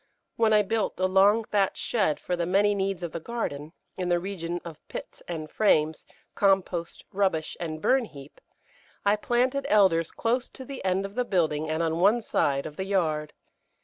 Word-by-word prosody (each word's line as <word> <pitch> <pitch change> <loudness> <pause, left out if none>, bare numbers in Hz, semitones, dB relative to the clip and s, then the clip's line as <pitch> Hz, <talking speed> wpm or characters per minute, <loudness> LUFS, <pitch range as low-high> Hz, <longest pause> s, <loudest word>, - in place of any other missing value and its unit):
When 225 -1 +3
I 210 -1 +5
built 220 0 -1
a 185 - +2
long 195 +4 +4
thatched 200 -3 0
shed 195 -10 0
for 180 - -2
the 170 -1 -2
many 205 +3 +3
needs 195 -2 -2
of 170 - -3
the 170 - -4
garden, 160 -8 -4 0.2
in 180 -1 -3
the 175 - +3
region 175 -2 -4
of 160 -3 -8
pits - - -8
and 160 -3 -5
frames, 155 -4 +1 0.3
compost, 190 -4 0
rubbish 190 -5 0
and 155 -2 -4
burn 260 +9 +2
heap, 140 -7 -13 0.6
I 205 +1 +4
planted 250 +5 0
Elders 175 -6 +4
close 240 +2 -1
to 260 - -11
the 275 0 -7
end 190 +1 +1
of 195 - -7
the 250 +3 0
building 160 -8 0
and 160 +1 0
on 165 0 -1
one 215 +6 +4
side 140 -8 0
of 150 -1 -8
the 190 - -3
yard. 155 -6 0
190 Hz, 185 wpm, -27 LUFS, 160-210 Hz, 0.6 s, I